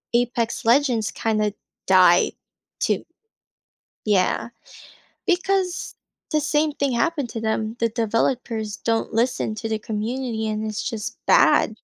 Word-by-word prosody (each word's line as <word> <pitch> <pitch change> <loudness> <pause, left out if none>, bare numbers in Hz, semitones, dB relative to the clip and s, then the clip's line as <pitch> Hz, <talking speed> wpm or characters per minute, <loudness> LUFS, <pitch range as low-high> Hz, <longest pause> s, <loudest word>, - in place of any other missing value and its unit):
Apex 240 -1 0
Legends, 235 -3 +3
kinda, 215 -2 0 0.3
died 180 -2 +6 0.5
too. - - 0 1.0
Yeah, 200 +1 +1 0.8
because 370 0 0 0.4
the 305 - +3
same 300 +1 +1
thing 280 -2 -1
happened 280 +2 0
to 225 - -5
them. 220 0 -1
The 230 - +2
developers 225 -1 -1
don't 225 -1 -1
listen 230 -1 0
to 225 +1 -5
the 220 -1 -1
community, 220 +1 -3
and 215 0 -2
it's, 215 - -3
just, 220 -3 -5
bad. - - +5
225 Hz, 120 wpm, -23 LUFS, 215-260 Hz, 1.0 s, died